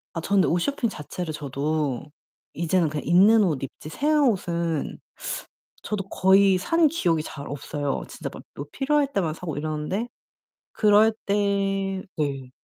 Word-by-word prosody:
아 165 - -2
저는 195 +2 +3
옷 175 - +2
쇼핑 245 +3 0
자체를 160 -1 -6
저도 145 -1 -2 0.5
이제는 170 0 +1
그냥 150 0 -4
있는 205 +6 +6
옷 155 -8 0
입지 135 +3 -7
새 295 - 0
옷은 175 - 0 0.8
저도 195 -2 -3
거의 190 0 +5
산 330 - +3
기억이 175 - +1
잘 140 -2 -8
없어요. 145 0 -3
진짜 - - -6
막 - - -9
뭐 140 - -6
필요할 280 0 +1
때만 165 -9 0
사고 165 -3 -5
이러는데 155 +9 -2 0.6
그럴 215 +1 +5
때 195 -1 0
네. 140 -4 -2
180 Hz, 260 characters per minute, -25 LUFS, 155-205 Hz, 0.8 s, 있는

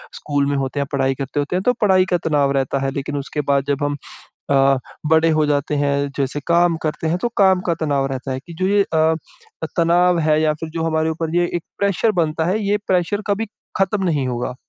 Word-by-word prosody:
School 145 - -1
में 145 - 0
होते 135 +1 -2
हैं 140 - -2
पढ़ाई 135 -1 +1
करते 140 +2 -3
होते 145 +5 -2
हैं 185 - -2
तो 250 - +4
पढ़ाई 190 -3 +4
का 175 - +4
तनाव 145 -2 +2
रहता 135 +1 0
है। 135 - 0
लेकिन 140 +1 -4
उसके 145 +2 -3
बाद 140 -1 +3
जब 140 0 0
हम 145 0 -1 0.5
अ, 135 0 +4 0.3
बड़े 160 +1 +4
हो 155 -1 +2
जाते 145 0 0
हैं 140 0 +1 0.2
जैसे 140 +1 -1
काम 170 0 +3
करते 160 +1 -2
हैं 165 +2 +1
तो 240 - 0
काम 190 -2 +4
का - - +3
तनाव 140 -3 +1
रहता 130 +1 -4
है 130 - -3
कि 170 - -10
जो 185 - +2
ये 200 +1 +3
अ - - +2 0.7
अ, - - -1
तनाव 175 +1 +3
है 155 -1 +2
या 155 -1 +2
फ़िर 160 +1 -7
जो 165 0 -3
हमारे 160 0 +1
ऊपर 160 +1 -3
ये 175 0 +3
एक 170 - -2 0.2
प्रेशर 200 +2 +2
बनता 160 0 -1
है 190 +5 +1
ये 205 +1 +2
प्रेशर 185 +2 +1
कभी 205 +2 0 0.3
ख़त्म 195 +1 +1
नहीं 145 -7 0
होगा। 125 0 -3
155 Hz, 235 wpm, -20 LUFS, 140-175 Hz, 0.7 s, तो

